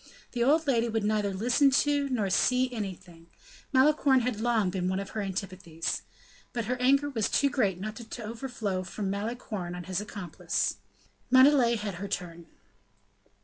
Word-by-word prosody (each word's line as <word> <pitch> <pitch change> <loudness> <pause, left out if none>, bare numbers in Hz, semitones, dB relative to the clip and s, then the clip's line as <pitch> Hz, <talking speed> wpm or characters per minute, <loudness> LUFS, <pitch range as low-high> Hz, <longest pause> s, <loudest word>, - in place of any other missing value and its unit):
The 240 -2 0
old 310 +5 +3
lady 235 -4 +2
would 225 -1 -1
neither 210 -1 +1
listen 245 +8 +3 0.2
to 285 -1 +1
nor 215 -7 0
see 255 +5 +2
anything; 185 -6 -7 0.4
Malicorne 275 -1 +4
had 235 -3 -2
long 225 -5 +2
been 180 -1 -1
one 190 +1 -1
of 195 - -6
her 215 - -3
antipathies. 185 -3 -4 0.5
But 235 -2 -2
her 250 +3 -1
anger 275 +3 +3
was 225 -5 0
too 280 -1 +2
great 205 -10 +1
not 215 +3 -5
to 235 0 -8
overflow 225 -4 -3
from 195 +2 -4
Malicorne 205 -4 -4
on 180 - -6
his 185 +2 -3
accomplice. 180 - -3 0.5
Montalais 260 -2 +6
had 210 -2 -4
her 200 - -3
turn. 170 -4 -5
215 Hz, 160 wpm, -28 LUFS, 190-250 Hz, 0.5 s, Montalais